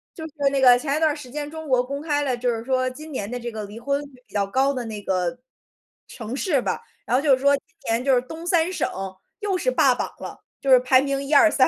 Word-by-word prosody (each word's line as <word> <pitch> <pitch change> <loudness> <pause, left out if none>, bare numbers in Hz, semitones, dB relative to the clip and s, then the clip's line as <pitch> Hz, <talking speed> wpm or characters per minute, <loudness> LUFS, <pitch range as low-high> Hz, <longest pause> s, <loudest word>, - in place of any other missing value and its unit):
就 320 - -7
是 320 - -8 0.2
那 275 -1 0
个 250 -1 +7
前 280 +1 -1
一 - - 0
段 315 -1 +4
儿 - - -3
时 295 -5 -10
间 295 +2 -5
中 315 0 -7
国 255 -2 +3
公 280 +3 -5
开 295 -2 0
了， 260 -3 -1
就 245 +1 0
是 225 - -5
说 255 0 +1
今 305 +5 -10
年 205 -7 -4
的 245 - -3
这 240 -1 -5
个 215 -2 -5
离 205 +2 -10
婚 280 +3 0
率 290 - -9 0.2
比 - - -24
较 200 -1 +1
高 265 +7 +2
的 250 -3 -4
那 215 -2 -6
个 185 +2 -1 0.7
城 225 -1 -7
市 280 0 +1
吧， - - -2 0.2
然 240 - +1
后 - - +1
就 285 -3 +5
是 260 - -9
说， 280 +1 +5
今 - - -18 0.2
年 225 +1 +1
就 270 -2 +4
是 245 - +3
东 320 +7 -9
三 345 0 +2
省， 370 - -1 0.5
又 400 -3 0
是 - - 0
霸 - - +4
榜 - - -2
了， - - -7 0.2
就 275 - +1
是 255 - +9
排 255 +1 +4
名 275 0 -1
1、 280 +2 -3
2、 315 +2 +7
3， 260 -3 +4
270 Hz, 290 characters per minute, -23 LUFS, 245-295 Hz, 0.7 s, 是